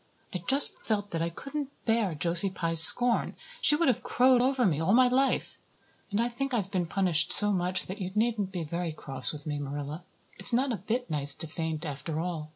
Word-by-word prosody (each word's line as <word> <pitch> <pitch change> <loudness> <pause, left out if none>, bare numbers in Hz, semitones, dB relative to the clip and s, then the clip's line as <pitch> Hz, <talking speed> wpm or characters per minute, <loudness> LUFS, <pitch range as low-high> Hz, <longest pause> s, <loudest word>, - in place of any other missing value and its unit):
I 180 - -3
just 275 +3 +2
felt 205 -2 -3
that 165 - -3
I 165 - -1
couldn't 275 - -6 0.2
bear 225 -7 0
Josie 170 +5 0
Pye's 165 -3 +2
scorn. 240 +8 +6 0.3
She 295 - +5
would 335 +2 0
have 250 - +1
crowed 255 0 +2
over 260 -1 +1
me 160 -5 0
all 185 +5 +1
my 255 +1 +5
life. 265 +2 -1 0.5
And 205 - -2
I 235 - +1
think 260 +2 -4
I - - +1
have 195 -3 -4
been 180 -3 -2
punished 170 -3 +2
so 210 0 +4
much 185 -1 -2
that 195 +3 -8
you 185 - -4
needn't 215 -3 -1
be 180 -3 -5
very 170 +1 -5
cross 135 -4 -4
with 150 -2 -10
me, 150 -2 -4
Marilla. 145 +3 -7 0.4
It's 195 +5 +7
not 260 +3 +1
a 230 - -3
bit 225 +4 -4
nice 145 -2 +1
to - - -1
faint, 160 0 -5
after 150 +2 -5
all. 165 -3 -5
185 Hz, 220 wpm, -27 LUFS, 160-240 Hz, 0.5 s, It's